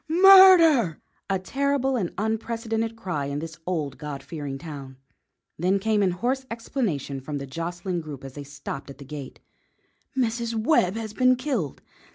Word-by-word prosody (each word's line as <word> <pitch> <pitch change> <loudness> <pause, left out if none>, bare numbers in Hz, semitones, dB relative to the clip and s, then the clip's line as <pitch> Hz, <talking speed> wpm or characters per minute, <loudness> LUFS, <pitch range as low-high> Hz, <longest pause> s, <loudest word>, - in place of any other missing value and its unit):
Murder!" 335 - +7 0.3
A 195 - +2
terrible 270 +6 0
and 190 -8 -1
unprecedented 225 +1 -2
cry 180 -10 -3
in 140 0 -3
this 160 +1 -7
old, 155 -6 -2
God 145 -2 -6
fearing 145 -3 -5
town. 140 -4 -9 0.6
Then 185 +4 +2
came 210 +1 +1
in 195 - +3
hoarse 245 +9 -1
explanation 200 - -3
from 145 +2 -5
the 140 - -5
jostling 175 +5 -4
group 145 -4 -9
as 135 -1 -8
they 145 - -7
stopped 140 -1 -7
at 140 - -10
the 140 - -11
gate: 140 -1 -8 0.8
"Mrs. 235 -2 0
Webb 220 - +2
has 220 -2 -5
been 255 +2 +4
killed! 250 - -3
190 Hz, 160 wpm, -25 LUFS, 145-235 Hz, 0.8 s, Murder